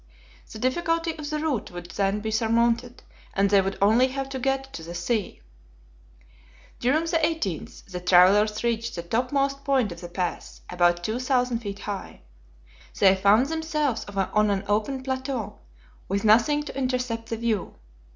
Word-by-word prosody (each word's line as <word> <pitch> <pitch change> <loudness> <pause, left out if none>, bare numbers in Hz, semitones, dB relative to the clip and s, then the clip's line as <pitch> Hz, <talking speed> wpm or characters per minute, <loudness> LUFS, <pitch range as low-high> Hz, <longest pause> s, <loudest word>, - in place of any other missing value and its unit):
The - - -8
difficulty 330 +7 0
of 300 -2 -6
the 305 - -1
route 300 -7 -2
would 175 -1 -9
then 200 +2 0
be 220 +1 -3
surmounted, 235 +2 +1 0.3
and 195 0 +2
they 200 -1 +6
would 195 +1 -3
only 220 +6 +4
have 270 +1 -4
to 265 -1 -4
get 270 +1 -1
to - - -6
the 170 +2 -8
sea. 195 - -2 1.4
During 280 +7 +2
the 330 0 +1
18th 270 - -2
the 180 -2 -6
travelers 195 +5 +4
reached 235 -1 -1
the 170 - -4
top 235 +8 -1
most 275 0 0
point 265 -8 +1
of 170 - -9
the 175 - -8
pass, 180 0 -4
about 175 -1 +2
2,000 250 +2 0
feet 200 -3 -6
high. 200 -2 -6 0.8
They 195 -1 +6
found 200 +6 +4
themselves 305 -4 -1
on 205 +1 +1
an 200 0 0
open 220 +6 -1
plateau, 260 - -4 0.5
with 200 +2 -1
nothing 240 +8 +4
to 295 - -8
intercept 250 -4 -2
the 225 - -2
view. 225 -3 -2
230 Hz, 160 wpm, -25 LUFS, 200-270 Hz, 1.4 s, they